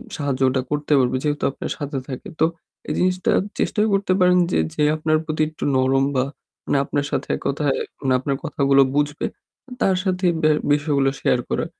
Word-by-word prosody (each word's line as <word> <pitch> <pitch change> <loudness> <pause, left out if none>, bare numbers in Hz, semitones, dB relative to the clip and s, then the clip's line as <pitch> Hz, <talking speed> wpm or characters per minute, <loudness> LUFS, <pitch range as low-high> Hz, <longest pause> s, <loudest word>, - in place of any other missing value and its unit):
সাহায্য 140 -4 -2
ওটা 130 0 0
করতে 150 0 0
পারবে 125 0 +1
যেহেতু 150 -1 -1
আপনার - - -6
সাথে 145 -1 -4
থাকে। 130 -2 -7
তো - - +5 0.4
এই - - 0
জিনিসটা 185 0 +1 0.3
চেষ্টাও 215 0 +1
করতে 195 -1 +2
পারেন 180 0 +5
যে, - - +2 0.2
যে - - -3
আপনার 155 0 +1
প্রতি 155 -1 -2
একটু 155 - -9
নরম 135 +1 +3
বা 130 0 +2 0.4
মানে - - +2
আপনার 145 -1 -1
সাথে - - -2
এক - - -8
কথায় 140 -1 0 0.3
মানে 130 -2 +1
আপনার 135 +1 -1
কথাগুলো 140 -1 +3
বুঝবে 145 0 0 0.6
তার 190 - +3
সাথে 185 -1 -1 0.2
ব্যা 155 -1 +4 0.2
বিষয়গুলো 145 -2 +1
শেয়ার 125 - +2
করা। - - -1
145 Hz, 185 wpm, -22 LUFS, 135-155 Hz, 0.6 s, তো